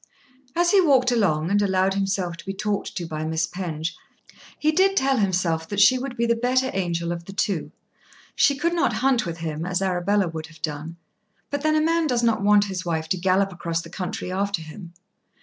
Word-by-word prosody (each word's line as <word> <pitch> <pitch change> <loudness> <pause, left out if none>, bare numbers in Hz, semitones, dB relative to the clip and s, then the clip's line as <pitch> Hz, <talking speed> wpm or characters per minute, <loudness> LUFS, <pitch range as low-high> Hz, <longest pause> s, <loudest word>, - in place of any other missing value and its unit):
As 345 0 +3
he 395 - +6
walked 265 -7 +4
along 180 -8 +1
and 205 0 +3
allowed 190 -1 +2
himself 195 -3 -1
to - - -12
be 195 - -3
talked 205 0 -3
to 175 - -3
by 155 -1 -4
Miss 160 +1 0
Penge, 165 -2 -4 0.6
he 310 - +2
did 385 +4 +3
tell 270 0 +2
himself 180 -5 0
that 205 - -2
she 250 +6 +6
would 260 -1 -6
be 235 - +1
the 235 - +3
better 255 +2 +1
angel 170 -2 -1
of 170 -1 -5
the 195 - -9
two. 195 -5 -1 0.6
She 280 - +4
could 335 +4 0
not 345 -8 +1
hunt 255 -7 +2
with 165 -1 -4
him, 160 -1 -4
as 180 +1 -1
Arabella 190 +1 +1
would 160 -1 -6
have 160 -1 -18
done; 155 +2 -4 0.5
but 285 0 -2
then 310 +1 +2
a 310 - +3
man 330 0 +2
does 245 -3 0
not 230 -3 +2
want 205 0 +5
his 190 -2 -4
wife 160 -2 -2
to 185 - +1
gallop 190 +2 +1
across 170 -1 -3
the 165 - -12
country 180 0 -4
after 195 -2 -1
him. 170 +2 -10
195 Hz, 215 wpm, -24 LUFS, 170-240 Hz, 0.6 s, he